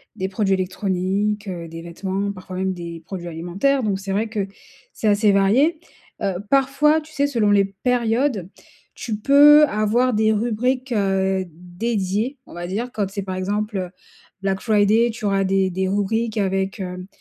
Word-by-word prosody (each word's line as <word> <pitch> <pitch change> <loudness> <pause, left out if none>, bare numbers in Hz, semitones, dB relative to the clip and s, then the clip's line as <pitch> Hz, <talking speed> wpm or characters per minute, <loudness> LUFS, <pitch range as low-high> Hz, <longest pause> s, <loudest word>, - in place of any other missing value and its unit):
des 190 - -2
produits 195 0 0
électroniques, 190 +2 -1
heu, 175 -3 -5
des 165 0 -8
vêtements, 190 +4 -3
parfois 185 -1 -8
même 190 0 -1
des 170 -2 -7
produits 180 -2 -6
alimentaires. 180 +12 0
Donc 200 -3 0
c'est 195 0 -5
vrai 210 +4 0
que 205 -3 -2 0.5
c'est 220 - -2
assez 210 0 +4
varié, 245 - +3 0.4
heu, 195 -2 -1
parfois 275 +3 +3
tu 310 +1 -16
sais 285 -1 +1
selon 230 -7 +1
les 200 -1 +4
périodes, 230 0 0 0.5
tu 220 -4 -4
peux 290 +5 +7
avoir 235 +1 +1
des 220 0 +3
rubriques, 245 +4 -1
heu, 190 -2 +1
dédiées, 195 - -3
on - - -14
va 175 +1 -5
dire, 225 +7 -3
quand 205 -3 -1
c'est 200 +1 -4
par 185 -1 -5
exemple 200 0 -2 0.5
Black 195 -1 -1
Friday 215 +1 +3
tu 220 -1 -7
auras 195 -1 +2
des 190 0 +2
des 190 +1 -1
rubriques 220 +3 -1
avec, 195 0 -1
hem, 180 0 -6
200 Hz, 165 wpm, -21 LUFS, 190-230 Hz, 0.5 s, peux